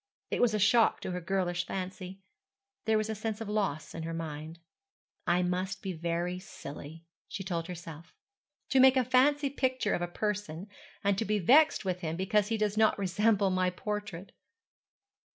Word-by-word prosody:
It - - 0
was 235 -3 +3
a - - +2
shock 225 +3 +4
to - - -4
her 180 0 -3
girlish 175 0 -1
fancy. 190 0 -6 0.6
There 220 0 +3
was 215 0 0
a 220 - -2
sense 215 0 -4
of 225 - -5
loss 200 -8 -2
in 165 - -5
her 165 +1 -4
mind. 160 0 -6 0.7
'I 175 +1 +3
must 185 +2 -2
be 190 -2 -3
very 170 +2 -2
silly,' 160 -2 -10 0.2
she 195 - -5
told 170 -3 -3
herself, 165 -2 -9 0.6
'to 270 - +4
make 265 0 +7
a 255 - +3
fancy 275 +3 +3
picture 260 -5 0
of - - -1
a 175 - -1
person, 200 -2 -3 0.4
and 200 -1 +2
to - - +1
be 215 0 +1
vexed 265 - +5
with 180 -1 -1
him 160 -1 -2
because 200 +3 +1
he 225 0 0
does 210 -1 0
not 220 0 +4
resemble 200 +1 +2
my 185 0 +2
portrait.' 200 -1 -5
190 Hz, 180 wpm, -30 LUFS, 175-215 Hz, 0.7 s, make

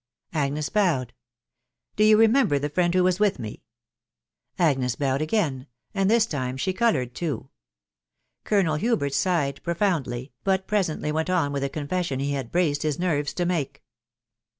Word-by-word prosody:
Agnes 145 -1 -1
bowed. 165 - +1 0.4
" 125 +1 -54
Do 210 - +3
you 215 0 +6
remember 225 - +4
the 145 +1 -3
friend 175 +1 +2
who 185 - +4
was 185 +1 +2
with 210 -2 +2
me 110 -2 -7 0.5
?" 120 +2 -55
Agnes 130 -4 0
bowed 135 0 0
again, 155 -7 -1 0.3
and 195 0 +1
this 225 0 +4
time 130 - -3
she 185 +7 -1
coloured 150 - +1
too* 160 +1 -4 0.9
Colonel 185 -8 +2
Hubert 165 - 0
sighed 155 -7 0
profoundly, 155 -8 -1
but 190 -1 +1
presently 175 -7 -1
went 160 +3 -1
on 170 -6 +1
with 140 -1 -2
the 140 - -1
confession 150 0 -2
he 140 +1 -1
had 135 -4 -3
braced 155 -5 +1
his 155 -3 -1
nerves 150 -5 0
to 175 - 0
make. 145 -6 -2
155 Hz, 165 wpm, -25 LUFS, 140-185 Hz, 0.9 s, you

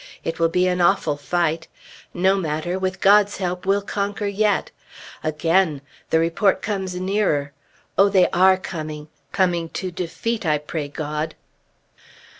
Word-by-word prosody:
It 165 0 -4
will 165 0 +3
be 180 +2 +2
an 180 0 0
awful 175 -4 +3
fight. 165 +2 -1 0.4
No 190 +2 +2
matter! 175 0 -2
With 185 -1 -3
God's 205 +1 +5
help 180 0 -3
we'll 200 +1 +2
conquer 200 +1 -3
yet! 205 +1 +1 0.5
Again! 155 0 +1 0.3
the - - +3
report 170 +4 +2
comes 190 -3 -3
nearer. 185 -7 0 0.5
Oh, 200 +1 +6
they 190 -2 +4
are 190 +1 +5
coming! 155 -4 -6 0.2
Coming 175 -4 +1
to 185 -1 -4
defeat, 210 +7 -3
I 155 -3 +2
pray 150 0 -5
God. 150 +1 -4
180 Hz, 140 wpm, -22 LUFS, 160-195 Hz, 0.5 s, Oh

